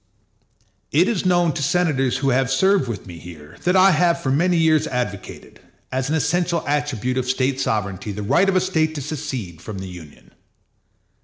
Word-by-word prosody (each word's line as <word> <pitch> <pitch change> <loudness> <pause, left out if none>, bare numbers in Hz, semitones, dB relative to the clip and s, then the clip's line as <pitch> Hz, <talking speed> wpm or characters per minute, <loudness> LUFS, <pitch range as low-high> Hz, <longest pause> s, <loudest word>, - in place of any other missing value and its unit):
It 170 +6 +3
is 205 -5 0
known 175 -3 +3
to 145 - -4
senators 140 -5 +1
who 135 0 0
have 130 0 +1
served 190 +3 +2
with 110 -5 -5
me 85 -3 -10
here 80 -3 -12
that 180 +1 +3
I 190 +1 +6
have 170 -2 +2
for 135 -6 -2
many 175 +5 +2
years 160 -2 +3
advocated, 120 -6 -5 0.3
as 130 +1 -2
an 155 - +1
essential 170 +1 0
attribute 135 -4 -1
of 125 0 -3
State 130 +1 0
sovereignty, 105 -4 -2
the 105 +1 -5
right 180 - +3
of 190 - 0
a 185 - +4
State 160 -4 0
to 145 - -4
secede 115 - -5
from 105 +1 -7
the 95 0 -6
Union. 80 -9 -13
135 Hz, 185 wpm, -21 LUFS, 110-170 Hz, 0.3 s, I